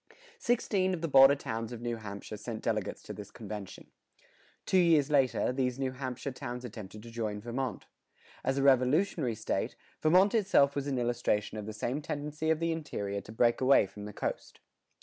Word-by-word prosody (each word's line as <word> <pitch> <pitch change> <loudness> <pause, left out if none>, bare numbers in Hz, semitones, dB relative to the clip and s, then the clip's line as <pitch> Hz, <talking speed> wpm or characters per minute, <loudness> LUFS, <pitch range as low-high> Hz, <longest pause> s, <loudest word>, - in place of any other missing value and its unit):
Sixteen 200 - +1
of 165 - -8
the 165 - -1
border 135 -1 +8
towns 115 -4 -4
of 120 - -6
New 120 0 -3
Hampshire 105 0 -7
sent 110 +1 -6
delegates 110 -3 -2
to - - -7
this 105 -1 -9
convention. 105 -2 -8 0.7
Two 190 - +3
years 160 -5 +4
later, 135 -3 +2
these 125 -1 0
New 135 -1 -1
Hampshire 130 +1 -5
towns 125 -1 -6
attempted 105 -2 -9
to 115 - -10
join 110 -3 -3
Vermont.[111:1] 120 0 -4 0.6
As 135 +1 +1
a 135 - +1
Revolutionary 135 - +3
State, - - -2 0.3
Vermont 185 +6 +5
itself 185 -11 +4
was 140 0 -2
an 135 -2 -1
illustration 120 -3 0
of 105 - -7
the - - -4
same 125 +7 -2
tendency 150 +1 -3
of 160 -1 +2
the 165 0 0
interior 100 -11 -3
to 105 - -12
break 120 +2 +2
away 130 -4 +6
from 105 +2 -10
the 105 - -7
coast. - - -4
125 Hz, 185 wpm, -31 LUFS, 110-145 Hz, 0.7 s, border